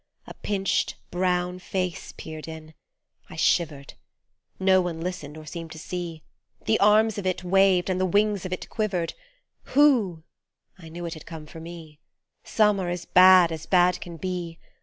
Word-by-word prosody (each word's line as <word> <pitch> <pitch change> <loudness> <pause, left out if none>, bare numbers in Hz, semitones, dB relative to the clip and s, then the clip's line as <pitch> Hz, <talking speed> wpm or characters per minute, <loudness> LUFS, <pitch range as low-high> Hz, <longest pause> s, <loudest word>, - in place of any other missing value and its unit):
A - - -9
pinched 195 -2 -1 0.2
brown 180 0 0
face 185 -1 -4
peered 155 0 -8
in 160 -1 -9 0.6
I - - -10
shivered; 150 -5 0 0.7
No 190 0 +4
one 175 -2 -4
listened 165 -4 -5
or 155 - -10
seemed 165 +1 -7
to - - -11
see; 170 -1 -6 0.4
The 220 - +2
arms 215 +1 +4
of 190 - -3
it 185 0 -2
waved 190 -1 +3
and 185 -1 -1
the 185 - +2
wings 205 +1 +1
of 185 - -6
it 185 - -4
quivered, 190 -6 -2 0.6
Whoo 235 - +4 0.6
f 170 - -13
knew 170 +2 -7
it 165 - -4
had 155 - -12
come 160 -2 -8
for 160 - -11
me; 160 -2 -10 0.4
Some 210 -2 +2
are 180 -2 -2
as 175 -1 -4
bad 185 -2 +7
as 160 0 -6
bad 180 -1 +3
can 170 -1 -8
be 175 -1 -4
180 Hz, 170 wpm, -25 LUFS, 165-190 Hz, 0.7 s, bad